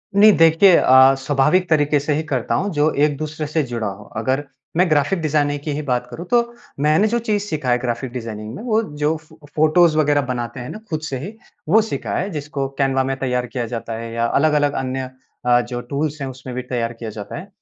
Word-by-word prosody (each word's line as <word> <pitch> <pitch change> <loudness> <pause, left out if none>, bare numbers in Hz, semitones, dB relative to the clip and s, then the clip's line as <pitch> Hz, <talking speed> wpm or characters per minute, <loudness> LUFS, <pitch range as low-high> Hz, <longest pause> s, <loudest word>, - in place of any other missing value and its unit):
नहीं 210 +2 +8
देखिए 165 +3 +6
अ, 130 +1 +6
स्वाभाविक 145 +7 +2
तरीके 150 -2 +3
से 145 +2 -1
ही 155 +2 -1
करता 130 -6 -1
हूँ 200 +11 0
जो 150 +1 +2
एक 150 -1 -1
दूसरे 155 0 -4
से 155 +2 0
जुड़ा 115 -3 -2
हो। 100 +1 -7
अगर 130 +5 0 0.3
मैं 180 0 +3
ग्राफ़िक 155 +5 +2
डिज़ाइनिंग 145 -2 0
की 150 - -3
ही 150 - -3
बात 125 -4 -1
करूँ 165 +8 -7
तो 240 -1 +5 0.4
मैंने 155 +8 +3
जो 235 +2 0
चीज़ 215 -3 -1
सीखा 155 -10 -3
है 120 - +4
ग्राफ़िक 120 +1 -3
डिज़ाइनिंग 110 -3 -6
में - - -8
वो 225 -2 +2 0.2
जो 150 +2 +1
फ़ 155 0 -20 0.2
फ़ोटोज़ 155 +1 +4
वग़ैरह 145 -1 +3
बनाते 120 -1 -4
हैं 125 - -6
ना 215 - -7
ख़ुद 155 -3 -2
से 135 - -3
ही 185 - -7 0.4
वो 220 +6 +6
सीखा 220 - -4
है 190 - -2
जिसको 145 -3 -3
कैनवा 135 -1 +2
में 135 +1 -1
तैयार 125 -2 -1
किया 120 -1 -3
जाता 115 0 -4
है 115 0 -6
या 115 0 0
अलग-अलग 145 +2 +2
अन्य 130 0 -3 0.4
अ, 120 0 +4
जो 120 0 -5
टूल्स 145 +4 -3
हैं 135 - -2
उसमें 130 -1 -8
भी 125 - -2
तैयार 120 -2 -3
किया 115 -1 -7
जाता 105 -1 -7
है। - - -8
145 Hz, 225 wpm, -20 LUFS, 125-155 Hz, 0.4 s, नहीं